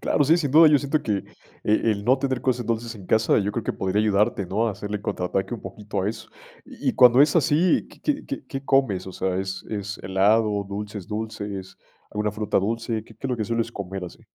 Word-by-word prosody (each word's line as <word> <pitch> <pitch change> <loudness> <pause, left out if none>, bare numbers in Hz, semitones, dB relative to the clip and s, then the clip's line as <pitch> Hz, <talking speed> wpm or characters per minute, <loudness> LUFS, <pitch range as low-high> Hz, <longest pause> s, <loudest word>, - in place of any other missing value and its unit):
Claro, 145 - +2
sí, 160 +4 +5
sin 145 -6 -1
duda. 160 +2 +8
Yo 150 -1 +5
siento 145 +2 -1
que, 105 -3 0 0.5
eh, 105 +1 +3
el 105 -3 +1
no 130 +3 +4
tener 130 -2 -1
cosas 125 -3 0
dulces 115 0 -2
en 100 -4 -11
casa, 110 +2 +3
yo 105 0 -1
creo 115 0 -3
que - - -1
podría 95 +2 0
ayudarte, 105 -1 +1
¿no?, 105 +6 0
a - - -2
hacerle 105 +1 -5
contraataque 95 +3 -2
un 115 - -8
poquito 105 -2 -5
a 95 - 0
eso. 110 +1 -7 0.4
Y - - -2
y - - -7
cuando 125 +1 +6
es 145 - +3
así, 165 +2 +3
¿qué - - -18
qué 295 -1 -1
qué 280 - -5
qué 135 0 -6
comes?, 125 -10 +2
o 95 - -7
sea, 95 0 -1
¿es 95 -1 -4
es 105 -1 -4
helado, 100 +2 +2
dulces 105 -1 -6
dulces, 105 -3 -5 0.3
alguna 105 0 -1
fruta 105 0 0
dulce? 110 +2 -2
¿Qué 110 - -16
qué 135 - -6
es - - -3
lo 125 - 0
que 110 - -2
sueles 115 +1 -1
comer 95 -2 -5
así? 90 - -11
110 Hz, 235 wpm, -24 LUFS, 100-125 Hz, 0.5 s, duda